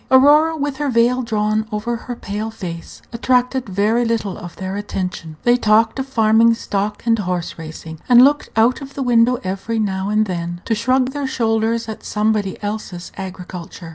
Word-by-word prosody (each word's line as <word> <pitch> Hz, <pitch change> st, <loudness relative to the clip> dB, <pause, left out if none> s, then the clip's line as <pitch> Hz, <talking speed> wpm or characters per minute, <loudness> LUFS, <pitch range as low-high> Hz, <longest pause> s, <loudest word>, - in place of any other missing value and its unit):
Aurora, 300 Hz, +5 st, +5 dB
with 285 Hz, -2 st, -2 dB
her 290 Hz, -1 st, -1 dB
veil 245 Hz, +1 st, +3 dB
drawn 215 Hz, -2 st, 0 dB
over 215 Hz, +3 st, -2 dB
her 245 Hz, +1 st, -6 dB
pale 210 Hz, 0 st, -4 dB
face, 180 Hz, -7 st, -8 dB
attracted 250 Hz, 0 st, +1 dB
very 210 Hz, +5 st, +1 dB
little 225 Hz, -4 st, -1 dB
of 175 Hz, -, -9 dB
their 190 Hz, 0 st, -5 dB
attention. 180 Hz, -6 st, -5 dB
They 240 Hz, 0 st, +4 dB
talked 225 Hz, +1 st, +3 dB
of 265 Hz, -, -3 dB
farming 230 Hz, -2 st, +4 dB
stock 205 Hz, -1 st, -3 dB
and 230 Hz, -1 st, +3 dB
horse 180 Hz, -4 st, -3 dB
racing, 160 Hz, 0 st, -8 dB
and 245 Hz, 0 st, +8 dB
looked 290 Hz, +1 st, +1 dB
out 235 Hz, +5 st, +3 dB
of 275 Hz, 0 st, -10 dB
the 275 Hz, -, -2 dB
window 240 Hz, 0 st, +4 dB
every 195 Hz, +5 st, -3 dB
now 195 Hz, -2 st, -1 dB
and 215 Hz, +1 st, +2 dB
then 175 Hz, -2 st, -4 dB
to 230 Hz, -, 0 dB
shrug 255 Hz, +4 st, +1 dB
their 285 Hz, -1 st, -3 dB
shoulders 225 Hz, -1 st, 0 dB
at 220 Hz, -, -7 dB
somebody 210 Hz, -2 st, 0 dB
else's 205 Hz, -4 st, -5 dB
agriculture. 180 Hz, -3 st, -8 dB
220 Hz, 175 wpm, -19 LUFS, 195-245 Hz, -, and